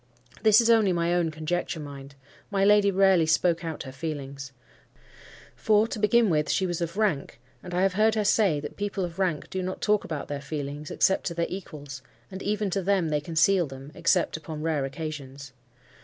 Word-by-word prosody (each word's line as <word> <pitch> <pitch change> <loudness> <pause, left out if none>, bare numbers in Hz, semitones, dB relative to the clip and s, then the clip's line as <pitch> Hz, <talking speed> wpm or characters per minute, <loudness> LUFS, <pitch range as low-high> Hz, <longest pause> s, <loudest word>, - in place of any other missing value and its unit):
This 215 -1 +6
is 230 - +3
only 220 -4 +4
my 170 0 0
own 175 -2 +1
conjecture, 160 +2 -3
mind. 140 -1 -9 0.3
My 195 -1 +1
lady 205 0 +5
rarely 190 -4 +4
spoke 165 +1 +2
out 160 -2 -5
her 130 - -8
feelings. 140 -2 -6 1.0
For, 215 0 +3
to 220 - -4
begin 220 +2 +4
with, 150 -1 +1
she 190 - +1
was 175 -2 -3
of 170 +3 -3
rank: 170 - -1 0.2
and 180 - -9
I 180 +1 +1
have 195 -1 +2
heard 215 +2 +3
her 215 - +1
say 195 -7 +3
that 150 - -8
people 200 -2 -2
of 170 +1 -9
rank 180 -6 -1
do 190 - -2
not 185 +1 -4
talk 210 -1 +2
about 155 -4 -5
their 145 -1 -4
feelings 145 0 -5
except 190 - +1
to 170 - -4
their 170 0 0
equals, 145 -7 -8 0.3
and 190 0 -7
even 210 -1 -1
to 195 - 0
them 190 -3 +1
they 150 -1 0
conceal 165 +3 +2
them, 135 +1 -10
except - - +1
upon 155 -1 -7
rare 155 -4 0
occasions. 140 -2 -7
170 Hz, 200 wpm, -26 LUFS, 150-195 Hz, 1.0 s, This